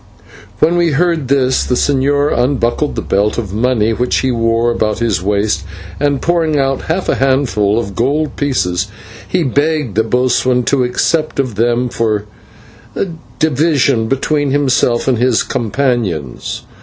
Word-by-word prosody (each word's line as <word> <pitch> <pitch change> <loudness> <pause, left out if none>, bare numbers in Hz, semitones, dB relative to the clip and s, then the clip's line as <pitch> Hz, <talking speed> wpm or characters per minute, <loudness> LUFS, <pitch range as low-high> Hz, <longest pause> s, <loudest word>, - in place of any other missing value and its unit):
When 170 +2 +2
we 170 -3 +2
heard 165 -2 +1
this 130 -1 +2
the 125 - 0
señor 145 +2 +1
unbuckled 125 +2 0
the - - -3
belt 100 +2 0
of 105 -5 -4
money, 115 -1 +1
which 125 +2 0
he 130 - 0
wore 115 0 +1
about 110 -2 -1
his 115 -6 0
waist, 100 -3 0 0.4
and, 140 -1 +1
pouring 165 -3 +1
out 135 -1 0
half 180 +4 -1
a - - +2
handful 130 -6 +1
of 100 -4 -3
gold 145 +6 0
pieces, 100 -10 -1 0.4
he 180 -2 0
begged 145 -2 0
the 110 +3 +2
boatswain 125 +1 +1
to 130 +1 +1
accept 155 +5 0
of 130 -4 0
them 120 +4 +1
for 110 -3 -1 1.1
division 145 -6 +2
between 145 +3 0
himself 130 -4 +1
and 125 -4 +2
his 125 -2 +2
companions. 115 - -2
125 Hz, 145 wpm, -15 LUFS, 115-145 Hz, 1.1 s, When